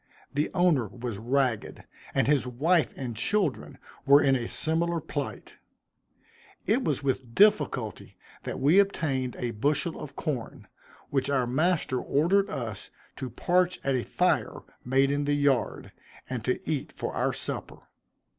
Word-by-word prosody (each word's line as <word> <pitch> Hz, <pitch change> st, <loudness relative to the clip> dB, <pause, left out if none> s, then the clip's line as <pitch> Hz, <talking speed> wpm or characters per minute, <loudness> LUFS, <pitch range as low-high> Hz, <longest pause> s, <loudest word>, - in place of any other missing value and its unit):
The 145 Hz, +2 st, 0 dB
owner 170 Hz, -, +3 dB
was 120 Hz, -1 st, -6 dB
ragged, 125 Hz, -1 st, -1 dB, 0.3 s
and -, -, +3 dB
his 140 Hz, -3 st, +2 dB
wife 155 Hz, +7 st, +2 dB
and 125 Hz, -4 st, -4 dB
children 180 Hz, -, -1 dB, 0.3 s
were 140 Hz, +1 st, +7 dB
in 135 Hz, -2 st, +3 dB
a 120 Hz, -2 st, -2 dB
similar 165 Hz, +2 st, 0 dB
plight. 145 Hz, -2 st, -6 dB, 1.1 s
It 235 Hz, +7 st, +2 dB
was 145 Hz, -3 st, -1 dB
with 130 Hz, -3 st, -2 dB
difficulty 195 Hz, -, +2 dB, 0.3 s
that -, -, -4 dB
we 150 Hz, +8 st, +5 dB
obtained 140 Hz, -10 st, 0 dB
a 120 Hz, -1 st, -2 dB
bushel 145 Hz, +9 st, 0 dB
of 140 Hz, -2 st, -8 dB
corn, 135 Hz, -8 st, -4 dB, 0.4 s
which 135 Hz, 0 st, 0 dB
our 135 Hz, -3 st, +2 dB
master 150 Hz, +1 st, +1 dB
ordered 195 Hz, +7 st, +2 dB
us 115 Hz, -, -5 dB, 0.3 s
to 130 Hz, -2 st, -4 dB
parch 180 Hz, +7 st, +1 dB
at 135 Hz, -, +1 dB
a 130 Hz, -, +1 dB
fire -, -, 0 dB, 0.2 s
made 135 Hz, +2 st, +2 dB
in 145 Hz, 0 st, 0 dB
the 145 Hz, 0 st, +2 dB
yard, 140 Hz, -4 st, 0 dB, 0.4 s
and 125 Hz, -4 st, -4 dB
to 125 Hz, -, -2 dB
eat 150 Hz, -3 st, -2 dB
for -, -, -4 dB
our -, -, 0 dB
supper. -, -, -6 dB
140 Hz, 145 wpm, -27 LUFS, 125-165 Hz, 1.1 s, were